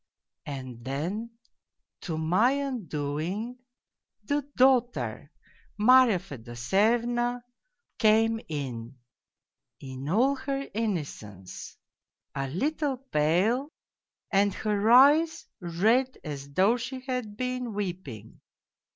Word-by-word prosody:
And 130 -4 -7
then, 170 - -3 0.7
to 160 -4 -4
my 185 +11 +3
undoing, 210 - -3 0.6
the 285 +7 0 0.2
daughter, 255 -2 +2 0.5
Marya 245 -1 +6
Fedosyevna, 210 - 0 0.6
came 225 0 +3
in, 130 -4 -5 0.8
in 135 +1 -7
all 255 +9 +3
her 275 +1 -3
innocence, 145 - -5 0.6
a 135 0 -2
little 275 - -1
pale 225 - +1 0.6
and 200 0 +3
her 210 0 0
eyes 290 +7 +6
red 220 +10 +1
as 140 -2 -7
though 195 +10 +3
she 260 +2 -6
had 250 -5 -4
been 250 -1 -2
weeping. 175 - -6
210 Hz, 90 wpm, -28 LUFS, 150-250 Hz, 0.8 s, Marya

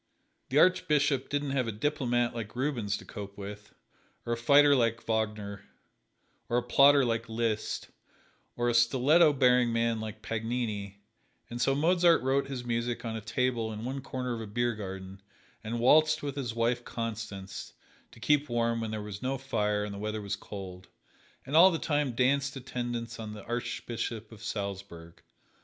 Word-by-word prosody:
The 135 - 0
Archbishop 150 -5 +3
didn't 145 -1 -1
have 130 -3 0
a - - -1
diplomat 120 0 0
like 115 -2 -6
Rubens 120 -7 -1
to - - -12
cope 100 -1 -8
with, 105 +1 -9 0.5
or 120 - 0
a - - +1
fighter 140 +5 +5
like 115 -3 +1
Wagner, 105 -3 -2 0.9
or 120 - +2
a 120 - +1
plotter 140 +3 +6
like 115 -1 -1
Liszt, 110 -1 -2 0.7
or 120 0 0
a 120 - +2
stiletto 135 +7 +5
bearing 125 -3 +4
man 115 -1 +1
like 110 0 -7
Paganini, 110 -3 -3 0.5
and 120 0 -4
so 135 - +3
Mozart 170 +1 +4
wrote 135 +1 +1
his 130 -3 -5
music 120 0 -2
on 110 -1 -3
a 110 - -4
table 115 0 -1
in 110 +1 -6
one 135 +2 -3
corner 125 -2 -4
of 115 - -4
a 110 - -6
beer 120 +3 0
garden, 95 -2 -7 0.4
and 115 +2 -3
waltzed 155 +5 +4
with 140 -2 -3
his 125 -5 -4
wife, 120 +1 +1
Constance, 105 -5 -6 0.4
to - - -17
keep 145 +4 +2
warm 115 -1 0
when 110 - -3
there 110 -1 -4
was 105 -1 -7
no 130 +1 -1
fire 105 -6 -1
and 105 - -6
the 100 - -7
weather 110 +1 -3
was 100 0 -2
cold, 95 -2 -9 0.6
and 140 +3 -3
all 175 +4 +9
the 170 - -1
time 145 -5 0
danced 135 +3 +1
attendance 120 -2 -4
on 110 -1 -6
the 105 - -9
Archbishop 115 -1 -4
of 110 -2 -13
Salzburg. 100 -6 -6
120 Hz, 175 wpm, -29 LUFS, 110-135 Hz, 0.9 s, all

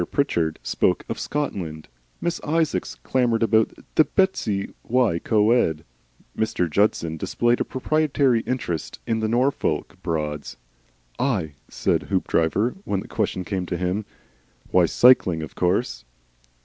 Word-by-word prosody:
Pritchard 85 - 0
spoke - - +1
of - - -3
"Scotland," 90 - -3 0.3
Miss 170 - -2
Isaacs 160 0 0
clamoured 120 -3 +1
of 115 - 0
Bettws 110 - +1
y 120 -8 +2
Coed, 105 -8 +2 0.5
Mr. 110 -5 0
Judson 85 -2 +1
displayed 120 +9 +1
a - - +4
proprietary 140 -2 +1
interest 90 - -3
in 115 -1 0
the 110 - 0
Norfolk 125 +5 0
Broads. 75 -5 -3 0.6
"I?" 95 - 0 0.2
said - - 0
Hoopdriver 95 - +1
when 100 - -1
the - - -10
question 95 - -2
came 95 -3 -3
to 90 - -2
him. 90 +4 -1 0.7
"Why, 90 -2 +5
cycling, 90 -8 +4
of 80 - -8
course." 95 +8 0
105 Hz, 125 wpm, -23 LUFS, 85-125 Hz, 0.7 s, Why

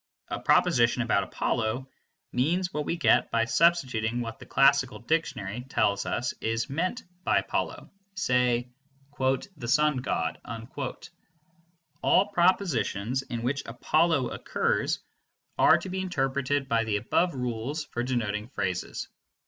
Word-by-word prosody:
A - - -3
proposition - - +3
about - - +2
Apollo 115 +4 -1 0.4
means 175 +8 0
what 150 0 -2
we 170 - -1
get 165 - +3
by 115 0 +2
substituting 125 -6 +2
what 115 -2 -5
the - - -12
classical 135 -1 +3
dictionary 125 -7 -2
tells 100 -5 +1
us 125 - -1
is 115 +3 -1
meant 185 - -1 0.2
by - - +3
Apollo, - - -2 0.2
say 125 -7 +1 0.5
"the 135 +2 -1
sun 150 +2 +3
god." 80 -10 -2 1.6
All 190 - +4
propositions 135 - +1
in 120 -3 -5
which 140 +3 0
Apollo 145 +3 +1
occurs - - -1 0.6
are - - +7
to - - -7
be 190 +1 -2
interpreted 140 -5 -1
by 115 -2 +2
the 110 -2 0
above 170 - +1
rules 125 +5 -3
for 120 - -4
denoting 110 -4 -2
phrases. 95 -8 -3
130 Hz, 125 wpm, -27 LUFS, 115-155 Hz, 1.6 s, are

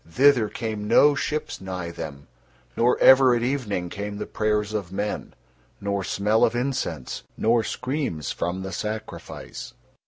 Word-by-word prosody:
Thither 125 +1 +4
came 105 -1 -4
no 145 +6 +6
ships 150 -2 -3
nigh 90 -2 -4
them, 70 -4 -7 0.5
nor 120 +2 +3
ever 130 -1 +7
at 120 - 0
evening 115 -9 -1
came 100 +2 -5
the - - -4
prayers 105 -1 0
of 100 -5 -3
men, 100 +2 -3 0.4
nor 100 -1 -1
smell 105 +4 +2
of - - +3
incense, 125 - -2 0.2
nor 115 +1 +3
screams 130 - -3
from 90 +2 -3
the 95 - -5
sacrifice. 105 +3 -6
105 Hz, 145 wpm, -25 LUFS, 95-125 Hz, 0.5 s, ever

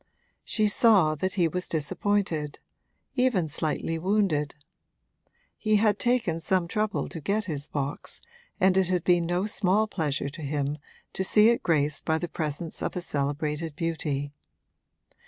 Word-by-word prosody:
She 215 -2 +1
saw 205 -7 +5
that 185 +5 -2
he 175 -4 +2
was 180 +3 -3
disappointed 160 -1 -1 0.6
even 250 - +2
slightly 160 +2 -2
wounded: 180 -6 +1 1.0
he 215 -1 +1
had 210 0 +3
taken 240 -10 +1
some 175 +1 0
trouble 210 +3 -1
to 165 - -8
get 205 +7 0
his 150 -5 -4
box 140 -1 -4 0.4
and 190 0 +4
it 190 -2 +3
had 180 -2 0
been 175 -2 +3
no 175 +3 0
small 210 0 +2
pleasure 150 -9 -2
to 155 +4 -10
him 145 0 -2 0.3
to 190 - -1
see 210 +3 +5
it 235 - +2
graced 150 -3 +1
by 160 - +1
the 175 - -3
presence 160 0 -4
of - - -3
a 180 - -2
celebrated 150 +2 -2
beauty. 150 -4 -2
170 Hz, 150 wpm, -27 LUFS, 150-200 Hz, 1.0 s, saw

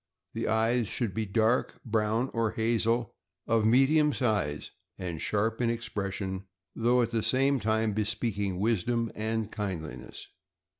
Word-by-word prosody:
The - - -2
eyes 115 +1 +2
should 115 -3 -2
be 110 +2 -2
dark 110 +4 +1
brown 110 +2 0
or 115 -2 0
hazel, 115 0 +1 0.3
of 110 -1 +2
medium 145 +5 +4
size, 100 - -1 0.3
and 85 -4 -5
sharp 110 +3 0
in 120 - +2
expression, 100 -4 -3 0.3
though 120 +2 +3
at 115 - -2
the 115 -1 +1
same 135 +4 +2
time 110 0 +1
bespeaking 105 -3 -1
wisdom 115 +2 0
and 110 0 -2
kindli 80 -10 -4
ness. - - -11
110 Hz, 140 wpm, -29 LUFS, 105-115 Hz, 0.3 s, medium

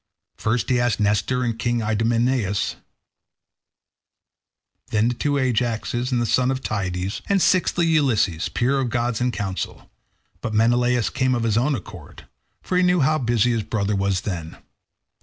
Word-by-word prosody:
First 115 +2 -1
he 125 - +3
asked 120 -1 +1
Nestor 105 +5 +1
and 115 -2 -2
King 120 -1 0
Idomeneus, 115 0 0 2.1
then 110 +2 +1
the - - -1
two 145 +4 -1
Ajaxes 120 0 -1
and 125 - +1
the 120 - 0
son 125 +3 +2
of 135 0 -2
Tydeus, 95 -1 -3
and 200 -1 +3
sixthly 175 -1 +2
Ulysses, 125 - +1
peer 135 +3 +1
of 130 -2 -1
gods 120 0 -1
in 125 - +2
counsel; 95 -4 -5 0.5
but 110 - -3
Menelaus 120 +1 +2
came 130 -1 +1
of 120 - -1
his 110 -2 +1
own 135 +5 +2
accord, 90 - -10 0.4
for 180 - -1
he - - +4
knew 180 -2 +3
how 155 +3 +2
busy 120 -1 +2
his 115 -2 0
brother 100 -1 -2
then 100 - 0 0.5
was. - - -15
120 Hz, 160 wpm, -22 LUFS, 110-130 Hz, 2.1 s, he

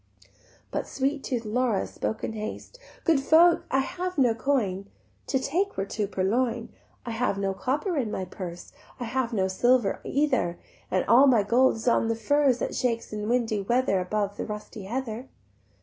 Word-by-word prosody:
But - - -2
sweet 275 +1 -1
tooth 240 -4 -2
Laura 230 -1 +1
spoke 220 - -4
in - - -2
haste: 220 - -7 0.2
"Good 325 -5 +3
folk, 330 +5 +5
I 270 - +2
have 365 +5 -4
no 250 -4 +4
coin; 220 -6 -1 0.4
To 270 - +1
take 360 +10 -1
were 195 - 0
to 205 +1 -2
purloin: 225 +5 0 0.4
I 235 - -4
have 225 -3 0
no 195 -1 -1
copper 290 - -1
in 235 -5 -1
my 190 -3 -3
purse, 175 -1 -8 0.3
I - - -3
have 240 +1 -1
no 190 -4 +1
silver 240 +3 +2
either, 280 -12 0 0.3
And 185 - +1
all 250 +6 +6
my 235 -6 +5
gold 245 +5 +3
is 225 +2 -7
on 235 -1 +3
the 230 - 0
furze 270 +3 +2
That - - -3
shakes 230 -3 -1
in 210 0 -3
windy 230 -4 +1
weather 235 -1 +1
Above 200 +2 -2
the - - -3
rusty 210 -1 -7
heather." 240 +2 -4
235 Hz, 180 wpm, -26 LUFS, 210-265 Hz, 0.4 s, all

